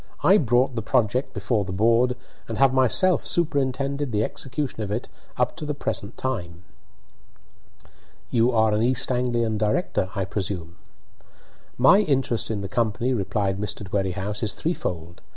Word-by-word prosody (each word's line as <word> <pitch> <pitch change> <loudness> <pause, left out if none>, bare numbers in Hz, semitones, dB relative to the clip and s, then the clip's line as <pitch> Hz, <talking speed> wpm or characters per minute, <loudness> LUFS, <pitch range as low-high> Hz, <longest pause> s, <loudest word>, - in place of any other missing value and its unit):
I 195 +4 +6
brought 125 - +2
the 115 - -2
project 125 +2 +1
before 110 -5 -1
the 95 - -6
board, 115 +5 +3 0.3
and 115 - -4
have 135 -1 +4
myself 135 +8 +3
superintended 140 -3 0
the 105 -1 +1
execution 135 0 -4
of 105 - -3
it 110 +3 -3 0.3
up - - +1
to - - -6
the 150 -1 -3
present 110 -5 -4
time." 90 -10 -4 1.7
"You 120 +1 +3
are 110 -2 +3
an 105 - +1
East 125 +2 +1
Anglian 120 -3 0
director, 105 - 0
I 95 -2 -1
presume?" 95 -3 -4 1.0
"My 135 +11 +6
interest 135 - +1
in 105 -3 -2
the 100 - -4
company," 115 +5 0
replied 100 -2 -1
Mr. 105 -1 -3
Dwerringhouse, 100 +2 -2
"is 110 -3 -1
threefold. 85 - -4
115 Hz, 150 wpm, -24 LUFS, 100-130 Hz, 1.7 s, I